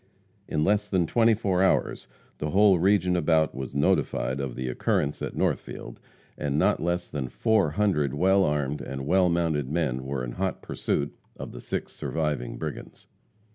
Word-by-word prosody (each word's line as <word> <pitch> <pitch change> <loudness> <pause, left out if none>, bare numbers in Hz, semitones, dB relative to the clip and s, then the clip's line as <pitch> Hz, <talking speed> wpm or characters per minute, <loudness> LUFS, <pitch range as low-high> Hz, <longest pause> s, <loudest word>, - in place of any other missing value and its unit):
In 75 - 0
less 105 +3 +1
than 90 -3 +2
twenty 115 +5 +3
four 95 -4 0
hours 95 - +1 0.3
the 75 - -2
whole 100 0 +5
region 90 -1 +3
about 80 -2 +2
was 65 +1 -6
notified 65 -2 +1
of 65 -3 -4
the 65 0 -4
occurrence 70 +3 -1
at - - -4
Northfield, - - -3 0.4
and 70 0 -1
not 100 +6 +2
less 85 +1 -1
than 65 -4 -4
four 110 - +2
hundred 75 -6 +1
well 95 +5 +4
armed 75 -2 -1
and 70 0 -5
well 90 +3 +3
mounted 80 -5 0
men 70 -5 -1
were 65 -1 -3
in - - -4
hot 95 +6 -3
pursuit 70 0 -2 0.2
of - - -7
the - - -9
six - - -4
surviving 75 -6 -3
brigands. - - -7
80 Hz, 170 wpm, -26 LUFS, 70-95 Hz, 0.4 s, whole